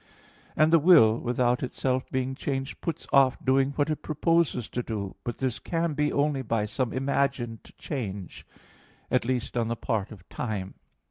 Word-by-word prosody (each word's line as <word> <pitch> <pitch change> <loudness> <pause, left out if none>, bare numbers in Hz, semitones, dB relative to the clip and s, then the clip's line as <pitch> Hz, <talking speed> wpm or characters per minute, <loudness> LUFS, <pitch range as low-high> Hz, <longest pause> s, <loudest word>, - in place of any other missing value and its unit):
And 155 +2 +4
the 165 - +8
will, 145 -10 +6
without 125 0 +1
itself 130 0 -1
being 130 0 -1
changed, 135 0 -4
puts 165 -4 -4
off 135 -2 +5
doing 135 +1 +3
what 145 +2 0
it 155 - -3
proposes 160 -5 +1
to 125 - -2
do; 105 -5 -5
but 120 - -4
this 130 -3 -2
can 165 -1 -1
be 150 0 +1
only 145 -1 +1
by 115 -3 -1
some 125 +3 -2
imagined 130 -4 -1
change, 100 - -5 0.7
at 125 - +2
least 125 -1 -2
on 115 -2 +1
the 115 - -1
part 110 -3 -2
of 95 -5 -13
time. 100 -5 -4
130 Hz, 165 wpm, -27 LUFS, 115-140 Hz, 0.7 s, the